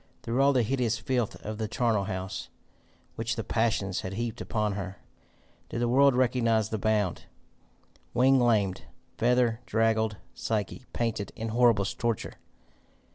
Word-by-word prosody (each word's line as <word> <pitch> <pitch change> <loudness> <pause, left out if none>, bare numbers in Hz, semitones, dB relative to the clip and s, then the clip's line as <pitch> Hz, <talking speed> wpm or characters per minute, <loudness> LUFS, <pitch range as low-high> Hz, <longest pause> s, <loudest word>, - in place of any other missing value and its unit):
Through 120 +3 0
all 140 +1 +5
the 130 -3 +3
hideous 120 -1 0
filth 120 -1 -1
of 110 +1 -5
the 110 - -1
charnel 110 -3 +1
house, 95 -1 -5 0.6
which 115 +1 -2
the 115 - -3
passions 105 -5 0
had 95 - -5
heaped 115 +2 -3
upon 105 -1 -1
her, 95 -1 -5 0.7
did - - -3
the 120 - +1
Word 135 +2 +5
recognise 115 -4 +2
the 110 - -2
bound, 105 -4 0 0.9
wing 130 +2 +4
lamed, 105 -6 +2 0.3
feather 120 -1 +3
draggled 110 -1 +1 0.2
Psyche, 110 +3 -3
panting 110 -4 -2
in 115 -1 -4
horriblest 115 -4 +2
torture? 115 -2 -1
115 Hz, 140 wpm, -28 LUFS, 105-120 Hz, 0.9 s, all